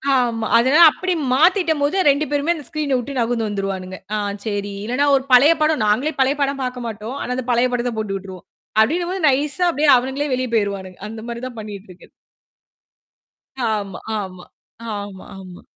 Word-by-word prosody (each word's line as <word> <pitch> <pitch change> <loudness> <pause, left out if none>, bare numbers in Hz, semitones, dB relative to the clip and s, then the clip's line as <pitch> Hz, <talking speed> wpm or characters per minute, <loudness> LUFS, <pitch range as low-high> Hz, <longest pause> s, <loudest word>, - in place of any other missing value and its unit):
ஆமா. 230 -3 0
அதனால 265 +8 +4
அப்டி 370 -1 -2 0.2
மாத்திட்டம் 325 -1 +3
போது 295 +7 +1
2 285 +2 +2
பேருமே 290 +4 +1
அந்த 295 -5 -9
ஸ்கிரீன்ன 295 -3 -1
விட்டு 265 +2 -5
நகுந்து 230 -1 0
வந்துருவானுங்க. 190 -2 -4 0.2
ஆ - - 0 0.3
சரி 205 -1 -3
இல்லனா 265 +5 +1
ஒரு 265 - +1
பழைய 285 +6 +7
படம் 305 -6 +2
நாங்களே 265 +9 +1
பழைய 270 +2 +2
படம் 275 -1 0
பார்க்க 250 -1 -4
மாட்டோம். 220 +5 -6
ஆனா 250 - -4
அந்த 255 -2 -4
பழைய 240 +1 +2
படத்த 245 0 -1
போட்டு 205 -2 -2
விட்டுருவோம். 190 -2 -11 0.4
அப்டின்னும் 345 +9 +1
போது 380 -1 -3
நைஸ்ஸா 295 +6 +1
அப்டியே 295 0 +2
அவனுங்களே 265 +3 -2
வெளியே 255 -1 -1
போய்டுவாங்க. 200 -3 -1 0.2
அந்த 225 0 -8
மாரி 235 0 -5
தான் 240 -3 -11
பண்ணிட்டிருக்கு. 200 -3 -10 1.6
ஆமா, 205 -2 -3 0.2
ஆமா, 185 -2 -8 0.5
ஆமா, 200 -2 -8
ஆமா. 185 -2 -11
245 Hz, 170 wpm, -20 LUFS, 205-285 Hz, 1.6 s, பழைய